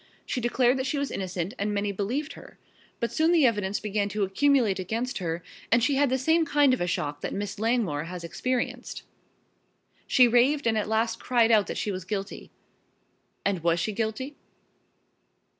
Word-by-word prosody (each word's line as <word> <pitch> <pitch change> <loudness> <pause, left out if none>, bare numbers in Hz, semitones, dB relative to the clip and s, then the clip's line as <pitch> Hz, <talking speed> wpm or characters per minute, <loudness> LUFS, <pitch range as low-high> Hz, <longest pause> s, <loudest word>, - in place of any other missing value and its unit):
She 250 - -2
declared 245 +2 +2
that 260 - -1
she 295 - -1
was 280 0 -2
innocent 185 0 -3
and 205 +1 -1
many 200 0 0
believed 245 - -3
her. - - -14 0.4
But 235 - -1
soon 320 +2 +2
the 330 -5 +5
evidence 205 -4 +1
began 205 -1 -1
to 205 +1 -1
accumulate 220 0 +2
against 225 +7 -3
her 165 -1 -3 0.3
and 230 0 +4
she 280 - +2
had 280 0 +3
the 260 - +1
same 320 +5 +3
kind 290 -3 +3
of 255 - -1
a 175 - 0
shock 145 -4 -2
that - - -4
Miss 200 0 -4
Langmore 215 -10 0
has 175 0 -7
experienced. 245 +9 -3 1.0
She 250 -1 +6
raved 250 +5 +3
and 225 -1 +2
at 215 -1 -1
last 225 +1 0
cried 235 -2 +2
out 215 -3 +4
that - - -4
she 210 - -1
was 185 -2 -5
guilty 195 +1 -5 0.5
" - - -44
"And 195 -3 0
was 170 +1 +2
she 215 - -1
guilty?" 230 +7 -3
220 Hz, 190 wpm, -27 LUFS, 195-255 Hz, 1.0 s, She